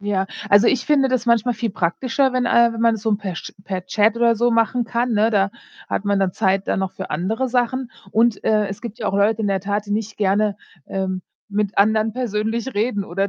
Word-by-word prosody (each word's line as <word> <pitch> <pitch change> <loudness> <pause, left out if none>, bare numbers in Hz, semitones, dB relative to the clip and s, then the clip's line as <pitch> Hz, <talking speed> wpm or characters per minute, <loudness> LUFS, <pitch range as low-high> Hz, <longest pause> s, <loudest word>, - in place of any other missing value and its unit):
Ja, 200 -2 -1 0.2
also, 205 +3 +6
ich 260 - +1
finde 280 -3 +3
das 255 -2 0
manchmal 235 0 +2
viel 230 0 -2
praktischer, 255 +10 0
wenn, 255 -1 0
äh 235 0 +4
wenn 225 - -6
man 230 0 +4
es 210 - -11
so 220 -2 +2
per 195 -4 -5
Sch - - -7
per 185 -2 -5
Chat 215 +3 +2
oder 235 0 +3
so 240 +2 +2
machen 230 +1 +1
kann, 235 +1 -1
ne? 215 +1 +3
Da 200 -2 +2 0.4
hat - - -2
man 200 -1 +1
dann 190 -2 +1
Zeit 190 +1 0
dann - - 0
noch 190 -1 -2
für 190 - -7
andere 220 +11 -1
Sachen. 250 +1 -1 0.2
Und, 225 0 +2
äh, 215 -1 +2
es 195 +1 -7
gibt 230 -3 -8
ja - - -3
auch - - -1
Leute 210 +2 +2
in - - 0
der 195 -1 0
Tat, 205 +2 -2
die 205 - -3
nicht 220 +1 -3
gerne, 205 0 +1 0.3
ähm, 190 -1 -3 0.3
mit 205 -1 -2
anderen 215 +2 +3
persönlich 230 +1 -2
reden 205 -1 0
oder 195 +2 -2
215 Hz, 235 wpm, -21 LUFS, 200-235 Hz, 0.4 s, also